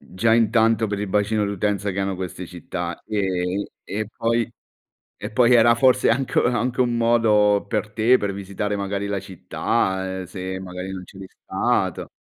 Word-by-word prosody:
Già 105 +6 0
intanto 115 -1 +3
per 100 -1 -3
il 105 - -3
bacino 105 +1 +1
d'utenza 100 0 -1
che 95 - -5
hanno 95 0 -1
queste 90 -1 -6
città, 85 0 -6
ehm, 95 -2 -1 0.2
e 105 +2 -4
poi 115 0 0 0.7
e - - -6
poi 125 +2 +4
era 120 0 +6
forse 130 +1 +4
anche 130 +3 0
u - - +1
anche 125 +1 0
un 120 -1 +1
modo, 105 -3 +3
per 105 - -2
te, 115 +4 +4
per 100 -1 -2
visitare 100 +1 -3
magari 100 0 -3
la 100 -1 -2
città, 95 0 -2
ehm, - - -5
se 95 +1 -6
magari 90 0 -6
non 95 -1 -6
c'eri 95 0 -11
stato. - - -1
100 Hz, 170 wpm, -22 LUFS, 95-115 Hz, 0.7 s, era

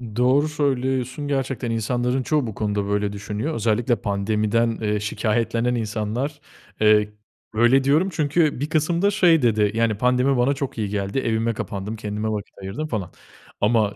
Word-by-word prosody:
Doğru 130 +5 +3
söylüyorsun. 135 -1 -1
Gerçekten, 135 -3 -2
insanların 125 +3 0
çoğu 150 -4 0
bu 110 - -5
konuda 105 -1 -1
böyle 105 0 0
düşünüyor. 105 +9 -4
Özellikle, 115 +2 +1
pandemiden, 110 +3 0
eee, 105 -1 0
şikâyetlenen 115 +3 0
insanlar, 115 +6 -3 0.4
eee, 105 -1 +5 0.4
öyle 120 +4 +4
diyorum. 155 +8 +3
Çünkü 155 -2 +1
bir 145 +2 -2
kısım 165 +2 +1
da 200 - +3
şey 175 -7 +4
dedi, 110 -3 +2
yani, 115 -2 +1
pandemi 125 +2 +2
bana 130 +3 +3
çok 135 -3 -5
iyi 105 -2 -2
geldi, 100 +4 -2
evime 115 -1 0
kapandım, 105 +1 -5
kendime 105 0 -3
vakit 105 -2 -4
ayırdım 100 +11 -4
falan 105 - -4 0.5
ama 105 -1 +2
115 Hz, 155 wpm, -23 LUFS, 105-135 Hz, 0.5 s, eee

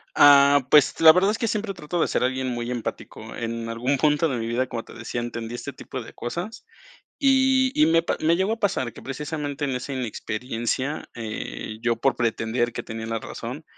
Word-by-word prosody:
Ah, 140 -1 +7
pues, 150 -2 +5
la 160 -1 +10
verdad 190 +4 +3
es 225 - -2
que 230 - 0
siempre 205 -2 -2
trato 170 +1 -3
de - - +2
ser - - 0
alguien 130 0 -1
muy 120 0 -3
empático. 120 -2 -6
En 115 0 -4
algún 125 +4 -1
punto 150 +2 +3
de 130 -4 -2
mi 115 - -3
vida, 125 +3 0
como 115 -2 -5
te - - -13
decía, 115 +1 -4
entendí 115 0 -5
este 140 +3 -6
tipo 130 - -7
de - - -12
cosas. 175 - -5 0.5
Y 265 -1 +4
y 305 - +5
me 165 0 +4
pa - - -1
me 165 +2 +3
llegó 190 +4 +1
a 225 - -4
pasar 130 - 0
que, - - -12
precisamente, 145 +2 -4
en 135 - -1
esa 130 +2 -4
inexperiencia, 125 +3 -3
eh, 110 - -6
yo 120 -1 +1
por 135 -3 +1
pretender 120 +1 0
que - - -5
tenía 110 0 -6
la 115 0 -2
razón, - - -7
130 Hz, 210 wpm, -24 LUFS, 115-160 Hz, 0.5 s, la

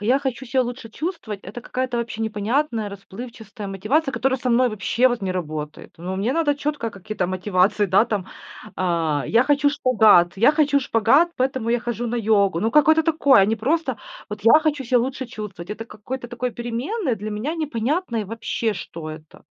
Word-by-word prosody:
Я 245 +6 +3
хочу 265 -2 -3
себя 260 +2 +2
лучше 245 -1 -6
чувствовать- 230 - -5
это 210 +6 -8
какая-то 255 0 -3
вообще 230 -1 -4
непонятная, 220 +2 -1
расплывчатая 215 +2 -9
мотивация, 265 - 0
которая 260 +2 0
со 250 0 -1
мной 250 +2 +4
вообще 225 +4 +2
вот 240 -2 -2
не 190 -1 -1
работает. 155 -4 -5
Ну, 180 +3 -5
мне 210 +6 0
надо 295 -1 +2
четко 290 -5 -3
какие-то 200 -1 -4
мотивации, 185 +2 +1
да, 195 +4 +4
там, 210 -5 -3 0.5
а: 165 -5 0
"Я 230 +2 +4
хочу 285 +2 +3
шпагат 220 - +4
я 230 +9 +5
хочу 295 -2 +3
шпагат, 260 +8 +3
поэтому 260 -3 -1
я 240 0 +2
хожу 240 0 -3
на 235 - -2
йогу". 200 -6 +2
Ну, 225 - +1
какое-то 310 +4 +5
такое, 300 -7 +4
а - - +5
не 220 +2 0
просто: 260 +1 -1 0.3
"Вот 210 -1 -6
я 270 +7 +7
хочу 300 -3 -1
себя 250 +1 +3
лучше 260 +2 -3
чувствовать". 210 -7 -8
Это 220 +2 -5
какой-то 240 +3 -7
такой 245 +1 -3
переменной, 245 - -2
для 215 +1 -6
меня 220 +10 -3
непонятно 295 -1 -2
и 220 - -1
вообще, 225 +1 -2
что 165 -4 -7
это. 155 0 -12
230 Hz, 185 wpm, -22 LUFS, 205-265 Hz, 0.5 s, я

